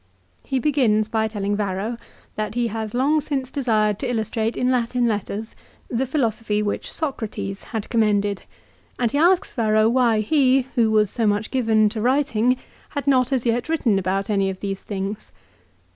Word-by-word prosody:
He 265 - -2
begins 245 -7 +2
by 220 0 0
telling 205 -1 -2
Varro, 205 +3 -2 0.4
that 215 +1 -4
he 240 -1 +1
has 220 0 -4
long 290 +5 +2
since 270 -3 -3
desired 215 -6 +1
to 260 - -2
illustrate 225 -1 -1
in 250 +1 +1
Latin 245 0 +1
letters 215 0 -3 0.4
the 255 +3 0
philosophy 225 -6 0
which 205 - -3
Socrates 220 -9 -4
had 220 -3 -4
commended, 205 -3 +1 0.6
and 240 -3 0
he 285 - 0
asks 365 +4 +3
Varro 215 -2 +3
why 235 -2 +3
he, 265 +2 +3
who 230 -3 +3
was 215 -2 +3
so 225 -2 0
much 205 +1 0
given 225 -4 +3
to 215 0 -4
writing, 255 -1 +2 0.3
had 285 - -4
not 260 -2 +3
as 255 -3 0
yet 240 +4 0
written 245 -11 +2
about 195 +1 -1
any 195 -2 +1
of 190 -1 -6
these 195 -1 -4
things. 200 +1 -5
225 Hz, 170 wpm, -22 LUFS, 210-255 Hz, 0.6 s, asks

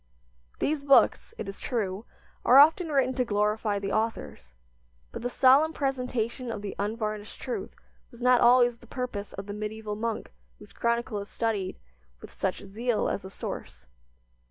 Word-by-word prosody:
These 295 -1 -1
books, 280 +10 +4
it - - -5
is 195 - -7
true, 210 -3 -3 0.4
are 255 - +6
often 320 +5 +7
written 270 -3 +2
to 255 - +1
glorify 210 -1 0
the 200 0 -3
authors; 70 - -3 0.6
but - - -6
the 245 - -2
solemn 275 +6 +5
presentation 250 -3 -2
of 210 -2 -6
the 200 - -5
unvarnished 215 0 -3
truth 250 - -5 0.3
was 235 - -16
not 250 0 +4
always 240 0 +5
the 240 - -18
purpose 225 -5 -5
of 195 - -6
the 205 - -6
medieval 210 0 -5
monk 225 +1 -3 0.3
whose 210 - -15
chronicle 235 -2 -1
is 200 - -8
studied 215 -5 -2 0.4
with - - -12
such 190 +1 -3
zeal 225 +4 -1
as 195 - -3
a 190 - -8
source. 65 - -7
225 Hz, 160 wpm, -28 LUFS, 205-250 Hz, 0.6 s, often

